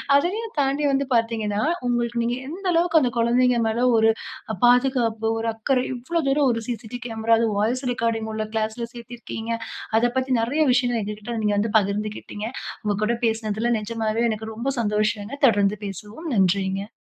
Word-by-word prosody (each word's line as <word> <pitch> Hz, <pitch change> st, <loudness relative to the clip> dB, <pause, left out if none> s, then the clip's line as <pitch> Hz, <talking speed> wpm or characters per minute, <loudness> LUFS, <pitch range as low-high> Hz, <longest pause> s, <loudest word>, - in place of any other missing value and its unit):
அதையும் 415 Hz, +10 st, 0 dB
தாண்டி 280 Hz, +2 st, +1 dB
வந்து 275 Hz, 0 st, +1 dB
பார்த்தீங்கன்னா, 225 Hz, -3 st, 0 dB, 0.3 s
உங்களுக்கு 240 Hz, -1 st, 0 dB
நீங்க 240 Hz, +1 st, 0 dB
எந்த 365 Hz, +6 st, -7 dB
அளவுக்கு 335 Hz, -1 st, +4 dB
அந்த 250 Hz, -, +2 dB
குழந்தைங்க 240 Hz, +1 st, +3 dB
மேல 235 Hz, +3 st, +1 dB
ஒரு 220 Hz, 0 st, +5 dB, 0.4 s
அ -, -, -3 dB
பாதுகாப்பு, 245 Hz, -3 st, +3 dB
ஒரு 225 Hz, 0 st, -2 dB
அக்கறை, 250 Hz, +4 st, 0 dB
இவ்வளோ 260 Hz, +8 st, -2 dB
தூரம் 275 Hz, -1 st, +3 dB
ஒரு 230 Hz, -, -1 dB
சிசிடி 240 Hz, 0 st, -5 dB
கேமரா, 225 Hz, -1 st, 0 dB
அது 230 Hz, -, +2 dB
வாய்ஸ் 240 Hz, +6 st, 0 dB
ரெக்கார்டிங் 230 Hz, -2 st, -1 dB
உள்ள 215 Hz, 0 st, -2 dB
கிளாஸ்ல 220 Hz, +2 st, -2 dB
சேர்த்திருக்கீங்க. 235 Hz, -1 st, -7 dB, 0.5 s
அத 240 Hz, +1 st, +3 dB
பத்தி 260 Hz, 0 st, 0 dB
நெறைய 255 Hz, +8 st, 0 dB
விஷயங்கள் 245 Hz, -2 st, +2 dB
எங்க 210 Hz, +1 st, -4 dB
கிட்ட 230 Hz, +2 st, -5 dB
நீங்க 210 Hz, -1 st, +2 dB
வந்து 210 Hz, +1 st, 0 dB
பகிர்ந்துகிட்டீங்க. 210 Hz, +1 st, -2 dB, 0.4 s
உங்க 205 Hz, -1 st, 0 dB
கூட 235 Hz, +3 st, +1 dB
பேசினதில, 225 Hz, +1 st, 0 dB
நெஜமாவே 225 Hz, +1 st, -1 dB
எனக்கு 220 Hz, 0 st, -4 dB
ரொம்ப 235 Hz, +5 st, -2 dB
சந்தோஷங்க. 210 Hz, +3 st, -1 dB
தொடர்ந்து 205 Hz, -1 st, +2 dB
பேசவோம். 210 Hz, -, -7 dB
நன்றிங்க. 195 Hz, +1 st, +1 dB
230 Hz, 160 wpm, -23 LUFS, 215-250 Hz, 0.5 s, ஒரு